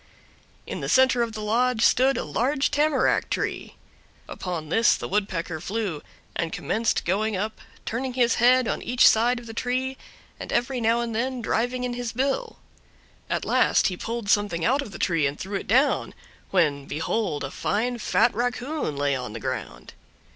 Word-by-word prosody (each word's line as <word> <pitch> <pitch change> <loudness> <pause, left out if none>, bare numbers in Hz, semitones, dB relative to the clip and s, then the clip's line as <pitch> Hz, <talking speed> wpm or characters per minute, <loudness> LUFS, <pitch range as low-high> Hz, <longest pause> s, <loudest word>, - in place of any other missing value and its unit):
In - - -5
the - - -4
center 260 -2 +4
of 230 -1 -1
the 215 -1 -5
lodge 235 +2 +1
stood 265 +2 +4
a - - -2
large 260 - 0
tamarack 290 -1 +2
tree. - - -3 0.5
Upon 170 -4 -5
this 225 +7 +4
the - - -5
Woodpecker 180 -5 -2
flew, 195 -5 -3 0.3
and 165 -1 -2
commenced 225 +5 -1
going 205 +3 0
up, 215 +3 -4 0.2
turning 250 +3 -3
his 245 -2 +3
head 250 0 +5
on - - -2
each 245 0 +4
side 240 +3 +4
of 240 - -12
the 225 - -8
tree, 255 +3 -2 0.4
and - - -7
every 245 0 0
now 230 +1 +2
and 235 -1 -3
then 255 +3 -1
driving 245 +2 -1
in 250 -1 -2
his 240 -1 -4
bill. 275 - -1 0.7
At - - -1
last - - +3
he 185 - -4
pulled 230 +3 -5
something 205 -5 +1
out 270 +4 +2
of 275 - -7
the - - -8
tree 165 -5 +1
and 140 +1 -5
threw 195 +2 -6
it - - -8
down, 260 +7 +2 0.3
when, 145 -7 +1
behold, 160 0 -2
a 135 - -4
fine 240 +3 -1
fat 235 +2 +2
raccoon 245 - -2
lay 140 -1 +1
on 125 -4 -5
the 115 - -6
ground. - - -5
230 Hz, 180 wpm, -25 LUFS, 185-250 Hz, 0.7 s, head